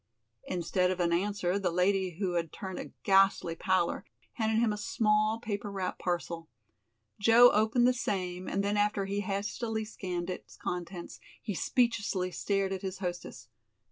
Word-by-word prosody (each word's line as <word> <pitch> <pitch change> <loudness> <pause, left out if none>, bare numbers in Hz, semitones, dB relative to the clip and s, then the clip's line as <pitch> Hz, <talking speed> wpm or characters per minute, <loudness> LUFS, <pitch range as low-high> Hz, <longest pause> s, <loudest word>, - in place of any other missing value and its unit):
Instead 180 +1 0
of 185 0 -2
an 170 -1 +2
answer 195 0 0
the 190 -3 0
lady 180 0 +1
who 190 -2 -1
had 165 -3 -1
turned 190 -2 -6
a - - -7
ghastly 195 -3 +4
pallor 185 0 +1 0.3
handed 220 -1 0
him 225 -2 +3
a - - -4
small, 215 +1 +1
paper 205 -2 -4
wrapped 190 -2 -3
parcel. 170 -2 -3 0.7
Joe 230 +4 +7
opened 220 +3 +3
the 255 - +4
same, 185 -6 -3
and 200 - 0
then 205 +1 0
after 205 -1 +1
he 200 +1 -2
hastily 215 +2 -2
scanned 180 -4 -4
its - - -9
contents 175 0 -5 0.2
he 210 - -4
speechlessly 205 -4 0
stared 195 0 0
at 190 - -4
his 190 -1 -4
hostess. 175 - -6
195 Hz, 160 wpm, -30 LUFS, 180-210 Hz, 0.7 s, Joe